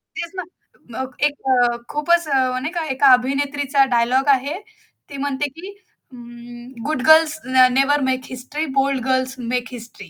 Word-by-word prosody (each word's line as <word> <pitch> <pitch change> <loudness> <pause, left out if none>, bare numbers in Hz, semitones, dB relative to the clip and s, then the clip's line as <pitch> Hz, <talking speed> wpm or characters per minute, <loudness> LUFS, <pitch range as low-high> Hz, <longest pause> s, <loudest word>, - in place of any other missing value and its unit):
तेच 340 0 -5
ना 370 - -4 0.5
मग 260 +2 -6
एक 295 - +1 0.2
अ, 245 -1 +2
खूपच 335 +3 +1
अ, 260 -3 0
नाही 300 +5 -4
का 335 - -1
एका 270 +1 +3
अभिनेत्रीचा 275 +1 0
डायलॉग 255 +4 +1
आहे. 280 +4 -4 0.5
ती 280 - -8
म्हणते, 285 0 -2
की 350 +4 -9 0.5
अं, 240 0 -12
"गुड 295 -4 -2
गर्ल्स 315 -1 +5
न 255 0 +4
never 280 +2 +2
make 255 0 -2
history, 260 +5 -5
bold 270 -2 0
girls 260 0 -1 0.2
make 245 -1 -1
history." 230 -6 -11
265 Hz, 160 wpm, -20 LUFS, 250-290 Hz, 0.5 s, गर्ल्स